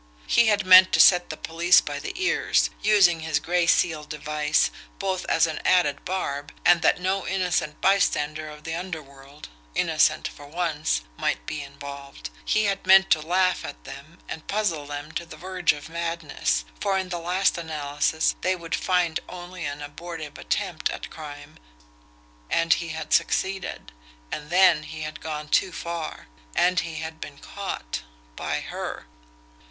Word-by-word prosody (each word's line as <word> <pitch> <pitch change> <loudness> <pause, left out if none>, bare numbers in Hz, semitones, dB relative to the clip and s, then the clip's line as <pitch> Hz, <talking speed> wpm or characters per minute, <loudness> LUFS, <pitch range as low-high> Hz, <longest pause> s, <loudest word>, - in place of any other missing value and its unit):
He 235 - +4
had 205 -2 +2
meant 185 0 +9
to - - +3
set 180 -1 +6
the 155 - -5
police 170 +3 +4
by 145 -1 -4
the - - -5
ears, 375 +1 +1
using 195 -5 +5
his 160 -2 0
gray 170 +2 +1
seal 160 -3 +2
device 150 0 0 0.3
both 190 -2 -2
as 165 - +3
an 160 -1 -4
added 160 -6 +2
barb 145 -6 -3
and 175 -1 +6
that - - +3
no 190 +1 -1
innocent 180 -5 -1
bystander 155 -6 +1
of 150 0 -12
the 160 - -4
underworld, 150 -5 -8 0.3
innocent - - +2
for 145 - -12
once, 155 - -1 0.2
might - - -1
be 150 - -4
involved 140 0 -9
he 215 - +2
had 195 -2 -1
meant 190 0 +7
to 155 - +5
laugh 185 +3 +1
at - - -8
them - - -11
and 160 - -7
puzzle 185 -9 -1
them 145 +1 -6
to 170 - -3
the 160 -2 -12
verge 180 0 +1
of 145 -1 -8
madness, 165 - -2
for 195 - +1
in 190 -1 -2
the 175 -1 -3
last 180 +3 +1
analysis 155 -1 0
they 185 +1 +1
would 170 -2 -7
find 175 -3 +1
only 180 -1 -7
an 145 +1 -5
abortive 155 0 -8
attempt - - -1
at - - -6
crime 145 -1 -10 0.9
and 165 0 +3
he 170 - -3
had 160 -1 -4
succeeded. 190 0 0 0.4
And 150 0 -5
then 180 -3 +5
he 155 +1 -8
had 155 0 -7
gone 150 -1 -5
too 190 - +2
far 170 -1 -5 0.3
and 180 0 +3
he 165 -1 -4
had 160 +1 -6
been 140 - -8
caught 195 - -5 0.3
by - - -2
HER. - - -6
165 Hz, 165 wpm, -25 LUFS, 150-180 Hz, 0.9 s, meant